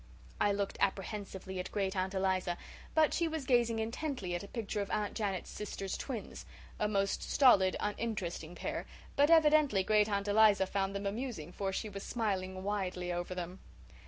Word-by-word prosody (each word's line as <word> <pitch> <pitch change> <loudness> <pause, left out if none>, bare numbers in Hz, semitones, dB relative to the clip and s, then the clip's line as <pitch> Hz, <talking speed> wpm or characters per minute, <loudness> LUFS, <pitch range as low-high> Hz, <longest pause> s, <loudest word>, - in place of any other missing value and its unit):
I 205 - +3
looked 200 0 -2
apprehensively 195 -1 -2
at 180 - -4
Great 195 -1 -1
aunt 190 +1 -1
Eliza; 185 -2 +1 0.4
but 315 -1 +4
she 340 - +1
was 315 -3 -3
gazing 240 -3 +3
intently 225 - -3
at 175 - -2
a 200 - -8
picture 215 -2 -3
of 200 - -4
Aunt 210 -1 -1
Janet's 200 -5 -2
sister's 195 -2 -4
twins, 245 -6 -5 0.4
a 210 - +2
most 195 -1 0
stolid, 200 -9 +5
uninteresting 205 -6 -3
pair; - - -4 0.3
but 285 +2 +5
evidently 305 - +5
Great 210 +1 +3
aunt 200 0 -1
Eliza 205 -2 +5
found 195 0 -1
them 200 0 -3
amusing 205 - -3
for 195 +1 -2
she 205 - -2
was 200 -1 -6
smiling 190 -5 -2
widely 185 -3 -2
over 175 +1 -3
them. 180 +1 -5
200 Hz, 170 wpm, -33 LUFS, 190-225 Hz, 0.4 s, stolid